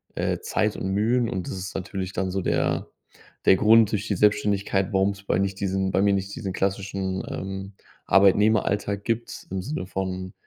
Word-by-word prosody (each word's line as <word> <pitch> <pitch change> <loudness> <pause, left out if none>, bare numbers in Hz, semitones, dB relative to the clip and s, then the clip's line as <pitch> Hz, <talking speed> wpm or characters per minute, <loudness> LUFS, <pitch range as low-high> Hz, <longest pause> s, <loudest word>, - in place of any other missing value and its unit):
äh, - - -1
Zeit - - -1
und 95 - -3
Mühen 115 +3 +2
und 95 -2 -4
das 95 - -5
ist 95 +2 -6
natürlich 95 0 -4
dann 95 -1 -1
so 95 - -1
der - - 0 0.6
der - - +7
Grund 110 0 +5
durch 105 +1 -2
die 100 - 0
Selbstständigkeit, 100 -2 +1
warum 95 +1 +3
es 100 0 -11
bei 90 - 0
nicht 100 0 -1
diesen 95 -1 0
bei 95 +2 +2
mir 100 0 +3
nicht 100 0 -2
diesen 100 -7 -4
klassischen, 95 -1 -2
ähm, 95 +1 -5 0.3
Arbeitnehmeralltag 100 +1 +3
gibt, 115 0 -3
im 95 - -2
Sinne 95 -5 -4
von: 95 -1 -4
95 Hz, 185 wpm, -25 LUFS, 95-105 Hz, 0.6 s, der